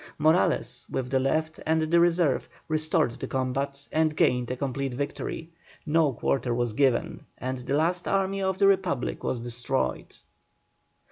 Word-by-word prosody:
Morales, 155 Hz, -10 st, +2 dB
with 125 Hz, -1 st, -3 dB
the 135 Hz, -, +3 dB
left 155 Hz, +4 st, 0 dB
and 160 Hz, 0 st, +2 dB
the 170 Hz, +2 st, +3 dB
reserve, 170 Hz, -5 st, +2 dB, 0.2 s
restored 155 Hz, -3 st, +1 dB
the -, -, -4 dB
combat 135 Hz, +2 st, -2 dB
and 155 Hz, -1 st, +2 dB
gained 125 Hz, -4 st, +2 dB
a 125 Hz, -, -1 dB
complete 135 Hz, -1 st, -2 dB
victory. 145 Hz, +4 st, -4 dB, 0.3 s
No 155 Hz, -2 st, +3 dB
quarter 125 Hz, 0 st, -1 dB
was 120 Hz, -2 st, -1 dB
given 130 Hz, 0 st, +1 dB
and 130 Hz, 0 st, -4 dB
the 130 Hz, +3 st, -2 dB
last 175 Hz, +4 st, +1 dB
army 195 Hz, 0 st, 0 dB
of 190 Hz, -1 st, 0 dB
the 195 Hz, -, +4 dB
Republic 185 Hz, -9 st, +1 dB
was 120 Hz, -, -1 dB
destroyed. 120 Hz, -, -2 dB
140 Hz, 150 wpm, -27 LUFS, 130-160 Hz, 0.3 s, the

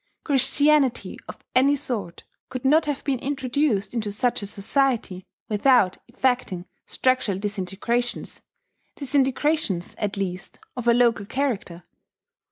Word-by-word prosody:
Christianity 285 Hz, -1 st, +2 dB
of -, -, -8 dB, 0.2 s
any 275 Hz, +3 st, +5 dB
sort 210 Hz, -10 st, -4 dB, 0.3 s
could 255 Hz, 0 st, -6 dB
not 305 Hz, +3 st, +4 dB
have 290 Hz, -1 st, -2 dB
been 270 Hz, -3 st, -1 dB
introduced 265 Hz, -6 st, -1 dB
into 215 Hz, -3 st, -2 dB
such 240 Hz, +3 st, 0 dB
a 200 Hz, -, -5 dB
society 215 Hz, -2 st, 0 dB, 0.2 s
without 215 Hz, -3 st, +3 dB
effecting 245 Hz, -7 st, -1 dB, 0.2 s
structural 255 Hz, -7 st, +1 dB
disintegrations, 205 Hz, +4 st, -3 dB, 0.5 s
disintegrations, 275 Hz, -, 0 dB
at 205 Hz, -1 st, -2 dB
least, 185 Hz, -1 st, -4 dB, 0.2 s
of 245 Hz, -1 st, -5 dB
a 235 Hz, -, +6 dB
local 235 Hz, -4 st, +2 dB
character. 220 Hz, -11 st, -2 dB
245 Hz, 115 wpm, -24 LUFS, 200-270 Hz, 0.5 s, a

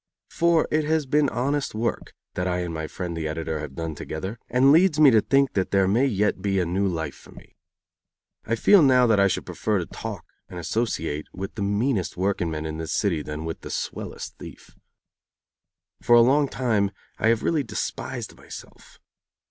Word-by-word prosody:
For 170 Hz, -1 st, +2 dB
it 155 Hz, 0 st, +2 dB
has 155 Hz, -1 st, +1 dB
been 145 Hz, +1 st, +2 dB
honest 135 Hz, +1 st, -1 dB
work 115 Hz, +2 st, -3 dB, 0.2 s
that 90 Hz, +1 st, -2 dB
I 90 Hz, 0 st, -1 dB
and 85 Hz, -2 st, -4 dB
my 80 Hz, -1 st, -4 dB
friend 90 Hz, 0 st, -5 dB
the 80 Hz, -1 st, -3 dB
editor 80 Hz, 0 st, -3 dB
have 75 Hz, -3 st, -7 dB
done 80 Hz, -1 st, -4 dB
together, 95 Hz, +9 st, -6 dB
and 130 Hz, +3 st, +4 dB
leads 165 Hz, 0 st, +4 dB
me 145 Hz, -3 st, +8 dB
to 110 Hz, -2 st, +5 dB
think 135 Hz, +4 st, +2 dB
that 95 Hz, -2 st, 0 dB
there 95 Hz, -1 st, +3 dB
may 120 Hz, +8 st, +3 dB
yet 105 Hz, -5 st, 0 dB
be 95 Hz, 0 st, 0 dB
a 90 Hz, -, +1 dB
new 95 Hz, +4 st, 0 dB
life 80 Hz, -5 st, -3 dB
for -, -, -17 dB
me. -, -, -16 dB, 0.9 s
I 115 Hz, -, -1 dB
feel 195 Hz, -, +6 dB
now 130 Hz, -3 st, +5 dB
that 110 Hz, -4 st, +3 dB
I 100 Hz, -, +5 dB
should 95 Hz, -, -2 dB
prefer 105 Hz, -1 st, -1 dB
to 90 Hz, -, -2 dB
talk -, -, -7 dB, 0.2 s
and 90 Hz, -, -8 dB
associate 80 Hz, -6 st, -2 dB
with 95 Hz, +1 st, -6 dB
the 110 Hz, -, -6 dB
meanest 100 Hz, 0 st, 0 dB
workingman 85 Hz, -5 st, -1 dB
in 80 Hz, 0 st, -5 dB
this 80 Hz, -, -4 dB
city 90 Hz, -7 st, 0 dB
than 75 Hz, +1 st, -6 dB
with 80 Hz, -, -5 dB
the -, -, -8 dB
swellest -, -, -5 dB
thief. -, -, -12 dB, 1.3 s
For 120 Hz, -, +5 dB
a 120 Hz, -, +8 dB
long 140 Hz, +4 st, +4 dB
time 110 Hz, -7 st, 0 dB, 0.3 s
I -, -, +2 dB
have 115 Hz, 0 st, +2 dB
really 160 Hz, -3 st, +1 dB
despised 115 Hz, -5 st, -5 dB
myself. -, -, -13 dB
100 Hz, 195 wpm, -24 LUFS, 85-130 Hz, 1.3 s, me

